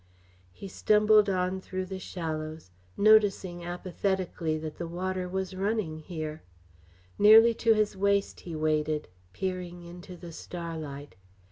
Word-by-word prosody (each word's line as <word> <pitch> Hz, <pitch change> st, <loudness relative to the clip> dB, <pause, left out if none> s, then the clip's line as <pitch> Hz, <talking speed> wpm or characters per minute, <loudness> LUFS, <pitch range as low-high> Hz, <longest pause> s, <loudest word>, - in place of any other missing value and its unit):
He 195 Hz, -, -9 dB
stumbled 210 Hz, +1 st, +4 dB
on 185 Hz, 0 st, -1 dB
through 185 Hz, 0 st, -4 dB
the 190 Hz, 0 st, -6 dB
shallows, 155 Hz, -, -5 dB, 0.3 s
noticing 200 Hz, -4 st, +4 dB
apathetically 175 Hz, -2 st, -2 dB
that 155 Hz, -1 st, -6 dB
the 170 Hz, -, -3 dB
water 185 Hz, +1 st, -3 dB
was 190 Hz, 0 st, -3 dB
running 195 Hz, -5 st, -1 dB
here. 155 Hz, -1 st, -6 dB, 0.8 s
Nearly 225 Hz, +3 st, +8 dB
to 230 Hz, -1 st, +5 dB
his 215 Hz, -1 st, +1 dB
waist 200 Hz, +1 st, +1 dB
he 170 Hz, -2 st, -7 dB
waded, 155 Hz, -2 st, 0 dB, 0.2 s
peering 180 Hz, -, -4 dB
into 175 Hz, +1 st, -10 dB
the 170 Hz, -1 st, -10 dB
starlight. 160 Hz, -5 st, -7 dB
180 Hz, 125 wpm, -28 LUFS, 160-195 Hz, 0.8 s, Nearly